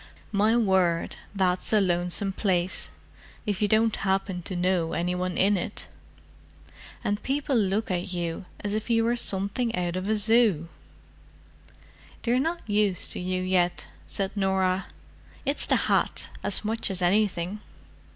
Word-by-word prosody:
"My 215 +3 +3
word, 190 -6 +2 0.2
that's 185 -2 +1
a 215 - +5
lonesome 180 +1 0
place, 185 -3 0 0.6
if 205 -2 -2
you 210 - +3
don't 220 +1 +3
happen 190 -1 -1
to 185 +2 -3
know 180 -2 +1
any 175 +1 0
one 180 0 -2
in 200 0 +3
it. - - -5 1.2
And 205 0 -1
people 275 0 -1
look 205 -1 +1
at 180 0 -2
you 175 0 -3 0.2
as 205 0 -2
if 215 +2 -3
you 225 -1 +3
were 235 +1 +2
something 225 +2 -1
out 175 -1 -1
of 185 +2 -3
a 220 - +3
Zoo." 210 -6 +3 1.5
"They're 245 +1 +2
not 330 +2 -2
used 205 -3 +1
to - - -2
you 185 0 -2
yet," 180 -1 +1 0.2
said 195 0 -2
Norah. 190 -1 +1 0.6
"It's 280 +1 0
the - - +3
hat, - - +1
as 205 +1 -1
much 225 +2 -1
as 185 -2 -2
anything." 195 0 +1
195 Hz, 150 wpm, -26 LUFS, 180-215 Hz, 1.5 s, a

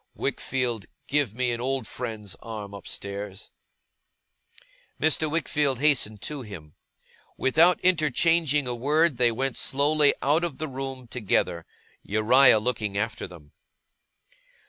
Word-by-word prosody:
Wickfield, 120 -5 -2 0.2
give 140 -6 0
me 125 0 0
an 120 0 -3
old 130 -1 -1
friend's 110 -4 -5
arm 105 -3 -7
upstairs!' 100 0 -7 1.5
Mr. 155 0 +1
Wickfield 150 -4 0
hastened 125 -8 +2
to 150 -2 -5
him. 90 -10 -10 0.6
Without 165 +7 +4
interchanging 160 -3 +2
a 125 - -2
word 145 +4 +2
they 120 -1 +4
went 130 +2 -2
slowly 145 +1 +2
out 150 +5 +2
of 170 -6 -3
the 155 - -4
room 135 -2 -6
together, 95 -7 -1 0.3
Uriah 115 +4 +5
looking 105 -3 -2
after 110 +1 -2
them. 75 -5 -15
125 Hz, 120 wpm, -26 LUFS, 105-145 Hz, 1.5 s, Uriah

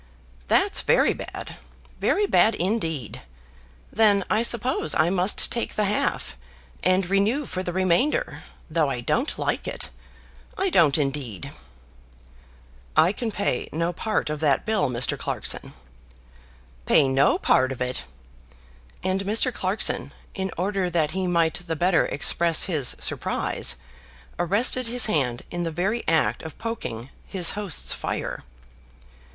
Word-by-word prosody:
"That's 395 +1 +4
very - - +3
bad; - - -8 0.4
very 415 - +2
bad 225 - +4
indeed. 165 - -2 0.7
Then 205 -3 +4
I 215 - +3
suppose 235 - 0
I 160 +3 +3
must 190 +1 +2
take 235 - -2
the 210 - +1
half, 205 - -1 0.5
and 185 0 +2
renew 205 +9 +1
for 185 - -4
the 180 - -4
remainder, 190 - +1 0.3
though 155 -3 +1
I 125 -3 -3
don't 240 - -1
like - - -2
it; - - -5 0.7
I 385 -1 0
don't 155 - +4
indeed." 135 - -3 1.5
"I 160 +3 +6
can 225 +1 -3
pay 200 -11 -2
no 165 +2 -1
part 215 -4 -2
of 150 - -4
that 145 -3 +1
bill, 220 -9 +1
Mr. 125 0 -1
Clarkson." - - -3 1.2
"Pay 145 - +5
no 135 +2 +3
part 130 +1 +2
of 130 - -6
it!" 125 0 -2 1.0
and 185 +1 0
Mr. 225 +5 +3
Clarkson, 190 +2 0 0.2
in 190 -2 -3
order 190 0 -1
that 160 -3 0
he 190 0 -2
might 165 -2 +2
the 165 - -1
better 175 +2 +2
express 165 +3 +2
his 150 -9 +1
surprise, - - 0 0.6
arrested 225 +8 +1
his 245 +1 +3
hand 130 - 0
in 175 - -3
the 170 - -1
very 190 +8 -1
act 165 -1 +2
of 160 -2 -9
poking 135 - -5 0.2
his 180 -4 +2
host's 205 -6 -1
fire. - - -4
180 Hz, 135 wpm, -24 LUFS, 155-215 Hz, 1.5 s, I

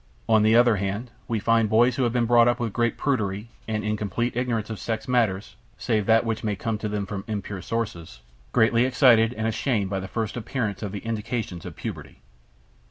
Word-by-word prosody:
On 110 -1 +5
the 110 +1 +4
other 120 -2 +5
hand, 100 +5 -3 0.2
we 115 - -1
find 115 +1 +2
boys 120 +3 +4
who 135 - -1
have 120 - +1
been 120 0 +1
brought 120 0 +5
up 120 +1 +2
with 115 -4 -2
great 120 -1 0
prudery 110 -6 -1 0.2
and 110 -1 -2
in 105 0 0
complete 105 +4 -2
ignorance 115 -3 -1
of 110 - -5
sex 110 -1 -3
matters 110 -6 0 0.2
(save 105 -3 0
that 115 +1 +4
which 110 -1 -2
may 105 -2 -1
come 110 +2 -3
to 105 - -3
them 105 -1 -2
from 95 0 -5
impure 105 -3 -4
sources) 85 - -4 0.3
greatly 115 +1 +4
excited 120 -3 +5
and 110 - -3
ashamed 110 -3 0
by 95 - -1
the 95 - -6
first 110 +2 -3
appearance 110 -4 -3
of 105 -3 -4
the 105 +2 -7
indications 105 -5 -4
of 80 - -9
puberty. - - -7
110 Hz, 210 wpm, -25 LUFS, 105-120 Hz, 0.3 s, On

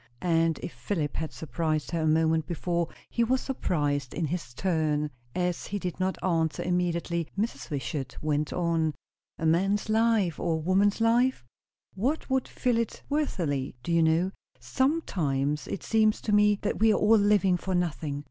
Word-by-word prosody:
And 165 -2 +2
if - - -5
Philip 155 -8 -3
had 160 -1 -3
surprised 155 +1 -2
her 165 -1 -1
a 155 - +1
moment 160 0 +2
before, 170 0 -1 0.2
he 235 - 0
was 255 +3 +2
surprised 145 - -1
in 170 - 0
his 160 -3 -4
turn. 155 -3 0 0.2
As 180 -1 -1
he 205 - -3
did 180 -3 -4
not 185 0 0
answer 165 -3 0
immediately, 170 -2 -1
Mrs. 140 - -2
Wishart 135 -1 -4
went 150 0 -1
on. 165 -3 0 0.4
"A 160 - -3
man's 195 +6 +2
life, 220 -6 +2
or 170 - 0
a 160 -1 -4
woman's 200 +4 +3
life? 235 - +2 0.5
What 260 +9 -2
would 265 -1 +1
fill 245 -2 0
it 230 - -3
worthily? 170 - -1
Do 175 - -3
you 170 0 +4
know? 165 +4 +2 0.3
Sometimes 150 - 0
it - - -5
seems 215 -1 +3
to 215 - -2
me 210 0 +5
that - - -1
we 220 +1 +5
are 210 - +3
all 215 +1 +5
living 200 -2 +4
for 185 +1 -2
nothing." 155 -4 -1
175 Hz, 170 wpm, -28 LUFS, 155-205 Hz, 0.5 s, me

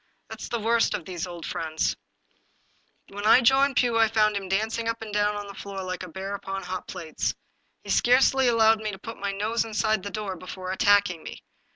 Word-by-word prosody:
That - - -9
is - - -6
the 235 - -2
worst 230 +1 +2
of 170 - -6
these 180 0 -5
old 175 -2 -8
friends! 160 -1 -2 1.1
When 205 +1 -4
I 245 - +7
joined 270 +2 +4
Pugh 240 -2 +2
I 225 - +6
found 215 -1 +2
him 195 -2 -4
dancing 220 +4 -1
up 230 0 -1
and 215 -2 -8
down 205 0 0
the 200 - -9
floor 195 -1 -7
like 185 0 -4
a 185 - -7
bear 190 +4 -5
upon 195 -1 -5
hot 185 +1 -5
plates. 170 -4 -3 0.5
He - - -5
scarcely 260 +1 +4
allowed 225 -2 +4
me 215 - -2
to 195 - -8
put 225 +3 -8
my 200 0 -2
nose 215 +4 -1
inside 215 -1 0
the 200 - -5
door 205 -2 -4
before 185 +1 -7
attacking 200 -3 +3
me. - - -10
205 Hz, 210 wpm, -26 LUFS, 190-225 Hz, 1.1 s, I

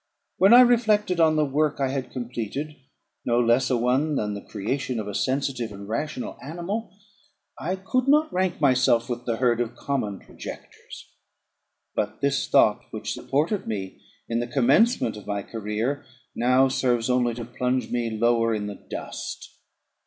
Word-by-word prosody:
When 195 +3 +5
I 245 +1 +10
reflected 215 -7 +3
on 160 -1 +5
the 155 -1 +3
work 145 +1 0
I 135 -1 +1
had 135 -1 -3
completed, 125 +4 -5 0.5
no 120 0 +2
less 120 +2 +3
a 125 - +2
one 130 +6 +1
than 105 -5 -1
the 100 - -6
creation 125 +3 -3
of 105 - -4
a 105 - -5
sensitive 130 -1 -1
and 100 0 -9
rational 125 +4 -4
animal, 175 - -5 0.6
I 180 +4 -2
could 245 +7 -1
not 300 +2 +4
rank 185 -1 0
myself 130 -4 +3
with 120 0 -4
the 115 - 0
herd 120 0 +2
of 120 -1 -3
common 110 -8 -2
projectors. - - -11 0.9
But - - -2
this 140 0 0
thought, - - +4
which - - -4
supported 155 +9 -1
me 95 -4 -5 0.3
in 115 0 -1
the 120 - -2
commencement 135 - +3
of 105 - -12
my 100 -1 -2
career, 110 +6 -3 0.3
now 125 +2 +4
serves 125 -3 +1
only 125 -2 +1
to 120 -1 -6
plunge 125 0 -2
me 120 -1 0
lower 115 0 +2
in 105 -1 -3
the 105 -1 -8
dust. - - -6
125 Hz, 165 wpm, -25 LUFS, 115-150 Hz, 0.9 s, I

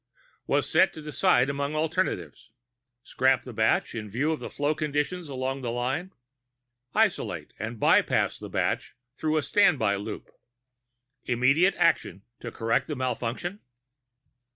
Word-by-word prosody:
was - - +1
set - - +4
to - - -9
decide 140 -4 +2
among 140 +1 -2
alternatives: 160 -5 -2 0.5
scrap 130 0 +2
the 125 - -9
batch 110 0 +1
in 110 -2 -5
view 135 +10 0
of 160 - -4
flow 145 +1 0
conditions 155 +2 -2
along 135 0 -3
the 120 - -3
line? 130 +10 -2 0.8
isolate - - 0
and 110 +1 -5
bypass - - +3
the - - -8
batch - - -1 0.2
through 155 +2 0
a 155 - +1
standby 130 - +3
loop? 100 +1 -7 0.9
immediate 140 +10 +3
action 95 +1 +1 0.2
to 120 - -7
correct 115 +1 0
the 150 - -3
malfunction? 130 - -3
135 Hz, 130 wpm, -27 LUFS, 120-155 Hz, 0.9 s, set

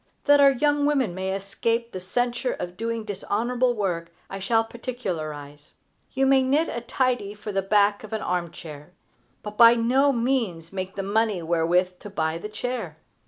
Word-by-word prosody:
That 290 0 +6
our 280 -1 +8
young 290 +2 +2
women 265 -10 +1
may 190 +1 -2
escape 230 +4 -2
the 185 - -5
censure 245 +6 -1
of 175 0 -6
doing 230 +2 -3
dishonorable 240 +5 -1
work, 175 -5 -2 0.2
I 195 - -5
shall 225 +4 +2
particularize. 155 - -6 0.4
You 270 0 +2
may 270 0 +5
knit 285 +5 +1
a 235 - -4
tidy 240 -4 -1
for 210 0 -6
the 195 -1 0
back 205 +1 +2
of 215 - -10
an 220 - -2
armchair, 170 -3 -5 0.5
but 210 0 -7
by 230 0 +8
no 260 +5 +3
means 230 -10 -1
make 185 0 -5
the 195 - -3
money 205 -2 0
wherewith 175 +2 +1
to 205 - -9
buy 160 -4 -2
the 210 - -6
chair. 245 +4 -4
210 Hz, 170 wpm, -25 LUFS, 180-245 Hz, 0.5 s, our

